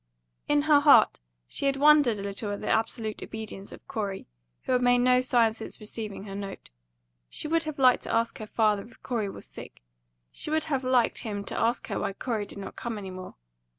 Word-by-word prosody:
In 295 0 +3
her 300 -1 +6
heart 285 0 +6 0.3
she 280 - -2
had 275 - +2
wondered 290 -5 +5
a 200 - -6
little 200 +1 -4
at 205 - -4
the - - -5
absolute 220 -1 -1
obedience 215 -3 -6
of - - -13
Corey, 200 -3 -4 0.4
who - - -3
had 250 -1 +3
made 245 0 +4
no 250 +1 +4
sign 240 -3 +3
since 220 0 -7
receiving 215 -2 -5
her 200 -1 -8
note. 195 - -7 0.6
She - - -3
would 330 +1 +1
have 310 -2 -5
liked 255 -2 +5
to - - -4
ask 230 0 0
her 215 - -6
father 210 -2 +1
if 235 - -21
Corey 225 -5 -2
was - - -9
sick; - - -11 0.5
she - - -4
would 315 0 +1
have 275 -4 -1
liked 255 -2 +2
him 205 -3 -4
to - - -5
ask 235 +2 +1
her - - -2
why - - -2
Corey 215 -1 -3
did - - -8
not 195 - -7
come 235 -2 -4
any 195 -2 -6
more. 185 0 -9
230 Hz, 220 wpm, -27 LUFS, 205-255 Hz, 0.6 s, her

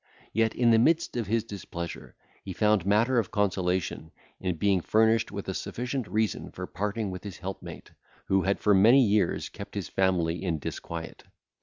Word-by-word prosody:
Yet, 110 0 +1
in 120 -1 +4
the 115 - +5
midst 160 +6 +2
of 115 -4 -2
his 115 +1 +1
displeasure, 90 -6 -7 0.3
he 95 - -6
found 105 -2 +2
matter 115 +5 +3
of 110 - -2
consolation, 95 -5 -1 0.3
in 90 -2 -2
being 95 +2 +2
furnished 110 +4 +2
with 100 0 -6
a 95 - -2
sufficient 125 +4 -4
reason 110 0 -1
for - - -6
parting 105 0 -3
with 90 0 -7
his 100 -3 -7
helpmate, 95 +1 -8 0.3
who 95 0 +2
had 100 +2 0
for 105 - +3
many 115 +7 +6
years 100 -4 +1
kept - - -10
his - - -4
family 90 -3 +1
in 85 -4 0
disquiet. 80 +3 -7
100 Hz, 175 wpm, -28 LUFS, 95-110 Hz, 0.3 s, many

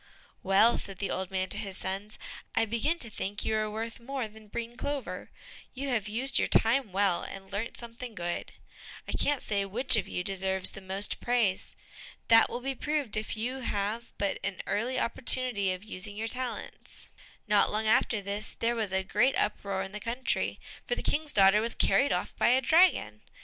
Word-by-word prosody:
"Well," 200 +5 +4
said 195 -1 -4
the 195 - -3
old 190 -1 -2
man 190 -1 -1
to - - 0
his 195 -2 -4
sons, 195 +3 -4 0.4
"I - - +3
begin 235 +10 0
to 235 -8 -6
think 205 0 -4
you 220 - +1
are 215 0 0
worth 225 +3 -5
more 260 0 -4
than 215 0 -15
breen 235 +3 -5
clover; 285 +1 -4 0.5
you 275 +2 -3
have 220 -5 0
used 245 +5 +1
your - - +2
time 225 -1 +4
well, 195 -2 +2
and 195 0 -9
learnt 205 +4 -3
something 235 0 -7
good. 175 -2 -3 0.6
I - - -4
can't 290 -2 0
say 200 -2 0
which 245 +6 +4
of 205 -3 0
you 180 - -3
deserves 190 0 0
the 195 - -9
most 190 +2 0
praise. 235 -6 0 0.5
That 225 0 +7
will 245 - -4
be 270 +2 -2
proved 290 -3 -2
if 215 +1 -3
you 245 +4 -2
have 220 0 -2
but 200 -1 -1
an 195 -1 -2
early 250 +5 0
opportunity 235 -4 +2
of 185 +1 -5
using 205 -1 -6
your 225 +1 -2
talents." 250 +2 -6 0.4
Not 210 -1 +4
long 215 +1 -1
after 220 -1 +3
this, 200 +2 -3
there 235 +1 0
was 220 -4 -1
a 190 0 0
great 210 +7 +2
uproar 200 -2 -1
in 190 - -7
the 210 - -6
country, 245 +4 -1 0.3
for 485 - +1
the - - -5
King's 300 0 0
daughter 195 -1 +6
was 230 +1 -1
carried 280 - +3
off - - -2
by - - +3
a 250 +2 +5
dragon. 330 +8 +3
220 Hz, 195 wpm, -29 LUFS, 195-245 Hz, 0.6 s, That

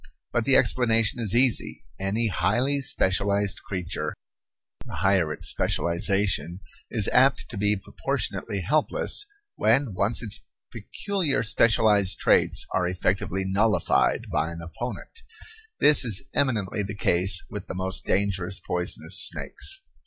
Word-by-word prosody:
But - - 0
the - - +4
explanation 115 -1 +3
is 110 -2 +1
easy. 125 -2 +2 0.2
Any 100 +4 -1
highly 120 - 0
specialized 100 -3 +1
creature, 85 -5 -5 0.7
the - - -9
higher 95 -5 +1
its 75 - -4
specialization, 90 0 0 0.3
is 110 -5 +2
apt 130 +1 +2
to 120 - -9
be 105 +1 +1
proportionately 100 0 -4
helpless 155 - +1 0.3
when 135 -6 +1
once 100 +6 0
its 105 -5 -1 0.3
peculiar 185 -11 -2
specialized 110 -3 +3
traits - - +2
are 90 -1 +1
effectively 95 +1 -2
nullified 100 -1 +1
by 80 - -1
an 85 0 -8
opponent. 120 - -7 0.6
This 150 -1 +6
is 115 0 +1
eminently 110 -7 0
the 100 +1 -5
case 90 -1 +1
with 105 -2 -7
the - - -6
most 95 +1 -2
dangerous 95 -1 -1
poisonous 90 0 -1
snakes. 390 0 -4
100 Hz, 125 wpm, -25 LUFS, 95-115 Hz, 0.7 s, This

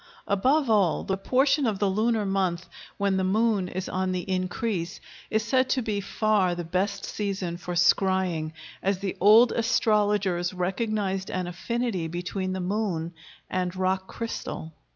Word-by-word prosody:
Above 265 +9 +2
all 205 -7 +3
the 190 - -1
portion 270 +7 +2
of 210 -3 0
the 200 +1 +1
lunar 215 +2 +1
month 185 -3 -1 0.3
when 200 -1 +1
the 190 - +1
moon 205 0 +2
is 185 +1 -4
on 185 0 -1
the 180 -1 -3
increase 185 -1 -2 0.3
is 220 0 0
said 255 +1 +2
to 265 - +2
be 215 -4 -2
far 200 -3 +1
the 175 - -4
best 195 +4 -1
season 195 -4 -3
for 175 0 -5
scrying, 175 -2 +2 0.3
as 195 0 +1
the 195 0 -3
old 220 +5 +7
astrologers 205 -6 +1
recognized 195 0 -1
an 185 -1 -2
affinity 190 0 -2
between 180 +3 -3
the 190 - -3
moon 180 -3 -2 0.3
and 180 -1 -2
rock 190 0 0
crystal. 195 -8 -5
195 Hz, 150 wpm, -26 LUFS, 180-215 Hz, 0.3 s, old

